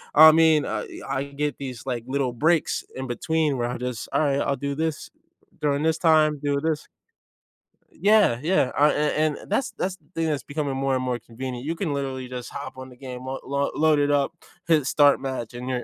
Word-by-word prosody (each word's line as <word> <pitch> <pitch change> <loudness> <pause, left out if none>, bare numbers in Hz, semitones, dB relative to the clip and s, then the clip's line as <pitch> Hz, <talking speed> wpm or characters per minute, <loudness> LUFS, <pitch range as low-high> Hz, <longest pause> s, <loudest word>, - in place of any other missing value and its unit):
I 155 +1 +10
mean, 160 -2 +4
uh, - - -2 0.2
I 135 0 -2
can 140 0 -14
get 150 0 -1
these, 130 -4 -7
like, 125 -3 -3
little 130 -2 -1
breaks 155 +6 +1
in 130 - -4
between 150 +4 0
where 120 0 -1
I 125 - -3
just, 125 -1 -5
"Alright, 140 -2 +2
I'll 140 - 0
do 140 -1 -3
this 160 -1 -3 0.5
during 145 0 +1
this 160 0 +2
time, 155 -3 +4
do 145 -1 +1
this" 160 0 -1 1.0
yeah, 205 - +3
yeah, 165 -6 +2
uh, 150 +1 +6
and 150 0 +1
and - - -13
that's 225 +2 0
that's 185 0 -2
the - - -32
thing 165 - 0
that's 150 -3 -1
becoming 145 -2 -3
more 135 0 +1
and 130 - -1
more 125 -1 -1
convenient. 125 +2 -7
You 165 - -1
can 165 -4 -2
literally 135 -2 -3
just 125 -1 -6
hop 130 -2 -7
on 130 0 -8
the 125 - -15
game, 125 -1 -8
l 140 +1 -2
load 155 -1 +3
it 145 0 +2
up, 140 +1 +1 0.3
hit 155 -4 +3
start 145 0 +5
match, 130 -4 -4
and 125 +1 -5
you're 125 -1 -2
140 Hz, 210 wpm, -24 LUFS, 130-155 Hz, 1.0 s, I